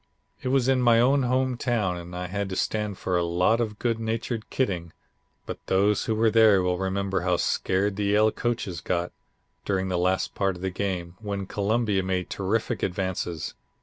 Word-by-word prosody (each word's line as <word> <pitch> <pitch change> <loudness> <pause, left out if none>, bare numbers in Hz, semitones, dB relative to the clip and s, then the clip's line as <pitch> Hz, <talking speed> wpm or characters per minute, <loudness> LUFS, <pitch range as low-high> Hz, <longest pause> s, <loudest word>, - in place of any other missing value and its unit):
It - - -4
was 130 -1 +2
in 130 -1 +3
my 120 -2 +5
own 135 +4 +4
home 130 0 +1
town, 110 -8 0
and 90 0 -8
I 90 0 -3
had 100 +2 -3
to 95 - -4
stand 105 -1 -1
for 90 - -2
a - - +1
lot 90 +7 +2
of 105 -2 -3
good 115 -1 -1
natured 115 0 -3
kidding, 90 -10 -2 0.5
but - - -7
those 100 +2 +2
who 110 - 0
were 110 0 +3
there 110 -4 +6
will 90 -1 0
remember 95 0 -1
how 90 -1 +1
scared 95 +3 0
the 105 - 0
Yale 105 +2 +4
coaches 105 -9 -2
got 85 -1 -1 0.5
during 95 -1 -1
the 90 -1 0
last 95 +1 +1
part 95 -2 0
of 90 - -10
the 95 - -1
game, 90 -2 -3
when 100 -2 -4
Columbia 105 0 0
made 95 -1 -2
terrific 100 +3 -1
advances. 90 -3 -2
100 Hz, 190 wpm, -26 LUFS, 90-115 Hz, 0.5 s, there